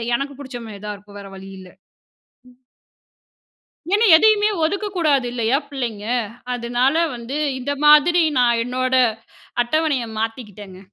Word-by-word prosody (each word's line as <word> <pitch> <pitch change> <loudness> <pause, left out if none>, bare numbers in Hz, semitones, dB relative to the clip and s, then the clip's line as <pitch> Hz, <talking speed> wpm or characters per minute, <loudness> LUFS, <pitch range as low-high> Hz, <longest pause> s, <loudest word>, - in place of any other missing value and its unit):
எனக்கு 275 +2 -4
புடிச்ச 260 -3 -8
மாரி 210 -2 -10
தான் 210 -1 -4
இருக்கும். 205 0 -14
வேற 195 - -11
வழி 195 0 -11
இல்ல. 185 -1 -13 0.8
ம். 245 - -22 1.4
ஏன்னா, 425 +3 +3
எதையுமே 425 +3 +4
ஒதுக்கக்கூடாது 335 -7 0
இல்லையா 240 +2 +1
பிள்ளைங்க? 235 -7 -5 0.5
அதுனால 245 +4 0 0.2
வந்து 240 +4 -6 0.2
இந்த 280 +3 -3
மாதிரி 305 +4 +6 0.2
நான் 235 -2 +3
என்னோட 255 +1 -2 0.7
அட்டவணையை 285 -2 0
மாத்திக்கிட்டேங்க. 210 -4 -6
250 Hz, 120 wpm, -20 LUFS, 225-295 Hz, 1.4 s, மாதிரி